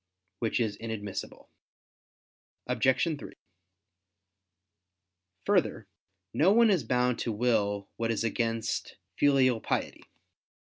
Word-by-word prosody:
Which 115 +1 0
is 110 -4 -1
inadmissible. 105 -4 -6 1.2
Obj. 125 +1 +2 0.2
3: - - -9 2.1
Further, - - +1 0.5
no 180 +5 +4
one 230 0 +5
is 180 -8 +2
bound 125 +1 +1
to 115 - -1
will 105 -3 0
what 115 0 -1
is 115 -1 0
against 115 0 -2 0.2
filial 130 -4 +3
piety. - - -3
115 Hz, 95 wpm, -29 LUFS, 110-130 Hz, 2.1 s, one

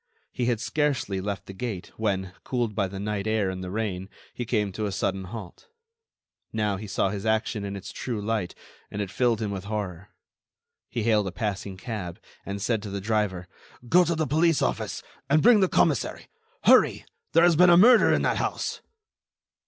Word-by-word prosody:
He 120 -2 -2
had 120 -3 +1
scarcely 125 -7 -1
left 100 0 -4
the 95 - -9
gate, 100 -2 -5
when, 95 -4 -1
cooled 120 -4 -1
by 100 -2 0
the 95 +1 -7
night 105 0 -2
air 110 -3 +1
and 95 0 -6
the 90 - -5
rain, 95 -2 -3 0.2
he 120 - -4
came 105 -3 0
to 105 +3 -3
a - - -3
sudden 95 0 -2
halt. 105 -1 -9 0.8
Now, 105 -2 0
he 105 +2 -7
saw 95 0 0
his 100 -1 -4
action 110 -1 0
in 100 0 -4
its 100 - -7
true 120 -4 -4
light, 105 -3 -2 0.3
and 105 - -6
it 100 -2 -3
filled 120 -1 +1
him 105 - -2
with 95 -1 -5
horror. 100 -3 -4 0.8
He 115 - -2
hailed 105 -3 +2
a - - -3
passing 100 0 -4
cab, 100 -6 -6 0.3
and 100 0 -3
said 110 +2 0
to 105 - -6
the 100 0 -3
driver: 100 -3 -1 0.4
"Go 180 +7 +6
to 170 0 0
the 155 0 0
police 160 +3 +2
office, - - -2 0.3
and 155 +2 +4
bring 235 -2 +7
the 190 -2 +3
commissary. - - +1 0.4
Hurry! - - +5 0.3
There 165 - +6
has 175 -1 +5
been 180 +3 +6
a 175 - +7
murder 235 +5 +7
in - - +2
that - - +1
house." - - -2
105 Hz, 195 wpm, -26 LUFS, 95-120 Hz, 0.8 s, bring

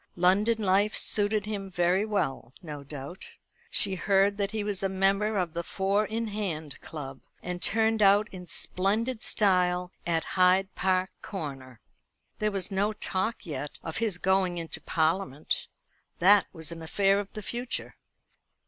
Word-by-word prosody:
London 205 +5 +3
life 200 +2 +3
suited 210 0 +1
him 200 -2 -4
very 180 +2 +2
well, 185 - -2
no 150 -3 -7
doubt. 140 +5 -8 0.4
She 200 - +4
heard 195 +2 +2
that 200 -1 0
he 215 -1 -3
was 205 -2 -2
a 195 - 0
member 195 +3 +2
of 175 -4 -1
the 170 - -2
Four 195 +4 0
in 225 +1 -2
hand 170 -8 -4
Club, 135 -4 -8 0.2
and 180 0 -4
turned 220 +3 +2
out 205 +1 +5
in 180 -2 -9
splendid 215 +8 0
style 180 -4 +2 0.2
at 165 -2 +1
Hyde 185 +2 +3
Park 185 0 +1
Corner. 135 - -7 0.6
There 215 - +1
was 195 -2 -2
no 200 +2 +1
talk 215 +3 -2
yet 150 -2 -5
of 160 - -4
his 220 -6 0
going 190 -1 +1
into 165 -1 -3
Parliament. 160 -2 0 0.5
That 200 +2 +5
was 160 -2 -5
an 165 0 -7
affair 195 +4 +2
of 200 -1 -5
the 215 - -6
future. 240 +4 -4
190 Hz, 155 wpm, -28 LUFS, 170-205 Hz, 0.6 s, out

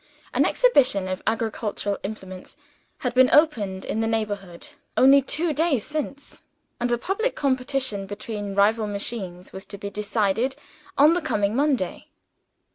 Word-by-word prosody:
An - - +3
exhibition 255 - +3
of 185 0 -3
agricultural 220 -2 -2
implements 190 +1 -8 0.4
had 250 -2 -1
been 255 0 +5
opened 215 -12 +2
in 220 - -2
the 225 - 0
neighborhood, 205 -2 -3 0.3
only 275 +2 +7
two 315 +4 -1
days 295 -7 +1
since; 295 -2 -5 0.4
and 240 0 0
a 240 - +2
public 400 - -1
competition 260 -6 0
between 205 -1 -5
rival 215 +2 +3
machines 200 -3 -4
was 190 - -7
to 200 - -8
be 200 0 -6
decided 210 +4 0 0.4
on 300 +4 +6
the 350 - 0
coming 205 -6 0
Monday. 270 -9 0
225 Hz, 140 wpm, -24 LUFS, 200-275 Hz, 0.4 s, only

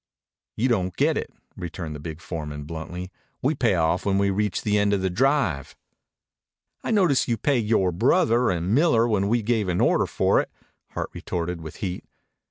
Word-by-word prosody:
"You 120 - +1
don't 95 -7 0
get - - +2
it," - - -3 0.2
returned 85 -2 -6
the 75 - -7
big 80 +1 -7
foreman 75 -4 -5
bluntly. 85 +4 -7 0.3
"We 140 +4 +2
pay 120 -9 +2
off 85 +2 +1
when 100 -1 +1
we 100 0 +2
reach 105 0 -1
the 105 -1 +2
end 100 0 +2
of 95 -2 0
the 95 - 0
drive." 120 - +1 1.1
"I - - -3
notice 185 - +3
you 115 -2 0
paid 120 -2 +1
yore 100 -5 +2
brother 120 - +3
and 90 +3 -1
Miller 125 -5 +4
when 100 -3 +1
we 115 +1 +1
gave 110 -3 0
an 90 - 0
order - - +3
for - - +2
it," - - -8 0.4
Hart - - -4
retorted 85 0 -4
with 80 -1 -8
heat. 90 -1 -4
100 Hz, 185 wpm, -24 LUFS, 85-120 Hz, 1.1 s, Miller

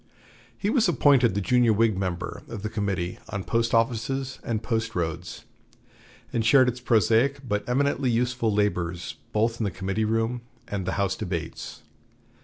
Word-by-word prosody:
He 205 - -1
was 230 -8 +3
appointed 135 - +4
the 100 - 0
junior 120 +2 +3
Whig 110 0 +3
member 90 -2 -3
of 110 -3 -7
the 110 - -3
Committee 95 -5 -2
on 100 -3 -4
Post 115 +6 0
offices 125 +3 0
and 110 -2 -2
Post 110 0 -2
roads, 85 0 -4 0.9
and 115 - +1
shared 130 +3 +6
its 125 0 -1
prosaic 125 +3 +2
but 105 -1 0
eminently 140 +1 +1
useful 120 -1 +1
labors 90 -4 -1
both 115 +2 +1
in - - 0
the 100 - +1
committee 95 +4 -2
room 115 +2 0 0.3
and 95 -3 -4
the 95 - 0
House 100 -1 0
debates. 85 -5 -5
110 Hz, 160 wpm, -26 LUFS, 100-125 Hz, 0.9 s, shared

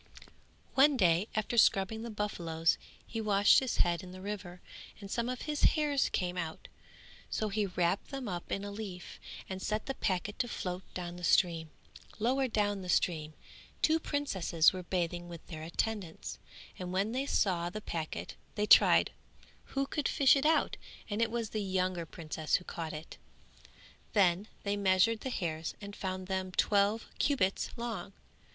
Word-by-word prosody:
One 275 +1 +5
day 180 -1 +3
after 215 +2 +1
scrubbing 205 +2 +3
the 235 - -5
buffaloes 170 -6 0 0.3
he 225 - -4
washed 205 -1 +5
his 260 -3 -2
head 175 0 +2
in 185 -1 -10
the 185 - -9
river 190 -2 -6 0.4
and 200 -2 -9
some 235 0 0
of 255 -1 -4
his 300 -1 -2 0.2
hairs 290 -3 +2
came 180 0 -1
out; 160 -2 -5 0.6
so 215 - -1
he 205 0 0
wrapped 180 +1 0
them 270 -3 -5
up 175 -3 -5
in 195 - -1
a 205 - -5
leaf 200 -4 -7 0.3
and 190 0 -5
set 215 +2 -1
the 270 - -2
packet 200 -2 -2
to 245 - +1
float 180 -5 -4
down 175 -1 -5
the 180 - -10
stream. 165 -2 +3 0.5
Lower 260 +4 +2
down 205 -3 0
the 180 - -7
stream 155 -4 +1 0.5
two 320 +1 +4
princesses 195 - +2
were 185 - -4
bathing 175 -1 -2
with 170 -2 -9
their 160 -3 -8
attendants, 170 +1 -3 0.4
and 180 -1 -4
when 195 +4 0
they 265 +3 -1
saw 175 -9 +1
the 215 - -5
packet 165 -6 -4 0.2
they 210 - +1
tried - - +7 0.5
who 275 0 -1
could 295 +1 -1
fish 275 -1 +5
it 275 +2 +2
out 320 - +2 0.3
and 210 +2 0
it 230 - +3
was 230 -1 -3
the 215 - -1
younger 185 -3 -1
princess 155 -2 -2
who 180 - 0
caught 165 -3 -5
it. 155 +1 -9 0.9
Then 190 -1 +3 0.2
they 200 0 0
measured 200 +3 +3
the 260 - -4
hairs 165 -8 -3
and 200 0 -8
found 185 -1 -4
them 190 0 -2
twelve 205 +3 +2
cubits 200 -10 +1
long. 225 -6 -4
195 Hz, 170 wpm, -32 LUFS, 175-225 Hz, 0.9 s, tried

